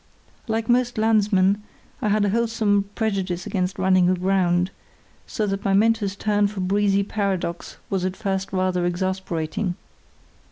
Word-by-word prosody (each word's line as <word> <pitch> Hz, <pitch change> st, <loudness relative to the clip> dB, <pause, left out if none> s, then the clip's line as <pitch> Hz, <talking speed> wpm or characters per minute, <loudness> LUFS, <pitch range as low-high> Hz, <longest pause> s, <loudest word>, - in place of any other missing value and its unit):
Like 225 Hz, 0 st, -1 dB
most 245 Hz, -1 st, +2 dB
landsmen 210 Hz, -2 st, +3 dB, 0.4 s
I 210 Hz, -, 0 dB
had 210 Hz, 0 st, +2 dB
a -, -, +1 dB
wholesome 220 Hz, -3 st, +1 dB
prejudice 190 Hz, -5 st, -2 dB
against 185 Hz, -1 st, -2 dB
running 185 Hz, -1 st, +3 dB
aground, 185 Hz, -1 st, +1 dB, 0.6 s
so 215 Hz, -, -2 dB
that 195 Hz, 0 st, -3 dB
my 195 Hz, -, +1 dB
mentor's 210 Hz, -1 st, +2 dB
turn 205 Hz, 0 st, +1 dB
for 200 Hz, -1 st, -7 dB
breezy 200 Hz, +1 st, +2 dB
paradox 195 Hz, -4 st, -3 dB
was 190 Hz, -2 st, -1 dB
at 185 Hz, 0 st, -2 dB
first 195 Hz, -2 st, -2 dB
rather 185 Hz, -1 st, 0 dB
exasperating. 180 Hz, 0 st, -2 dB
195 Hz, 135 wpm, -23 LUFS, 185-210 Hz, 0.6 s, landsmen